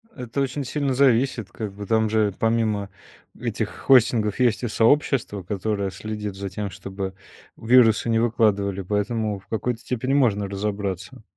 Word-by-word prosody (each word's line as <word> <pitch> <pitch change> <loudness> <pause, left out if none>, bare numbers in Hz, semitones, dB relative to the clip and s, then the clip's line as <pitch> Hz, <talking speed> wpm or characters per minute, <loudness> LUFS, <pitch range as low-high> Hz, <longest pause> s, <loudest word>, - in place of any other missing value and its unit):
Это 125 +2 -3
очень 135 +1 -2
сильно 140 -1 -1
зависит. 125 -5 +2
Как 105 -3 -6
бы 100 0 -7
там 110 +1 +2
же, 105 -2 +1
помимо 110 -3 +1 0.5
этих - - -2
хостингов, 115 -4 +3
есть 120 -1 +2
и - - 0
сообщество, 115 -4 +1
которое 100 +1 -2
следит 105 +1 -5
за 100 0 -5
тем, 100 +2 -4
чтобы 95 0 -6 0.4
вирусы 115 -1 +4
не 115 0 +3
выкладывали. 100 -4 +1
Поэтому 105 +2 -1
в 95 - -24
какой-то 115 +2 -2
степени 125 +2 -2
можно 105 -8 +2
разобраться. 100 -1 -4
110 Hz, 150 wpm, -23 LUFS, 100-120 Hz, 0.5 s, вирусы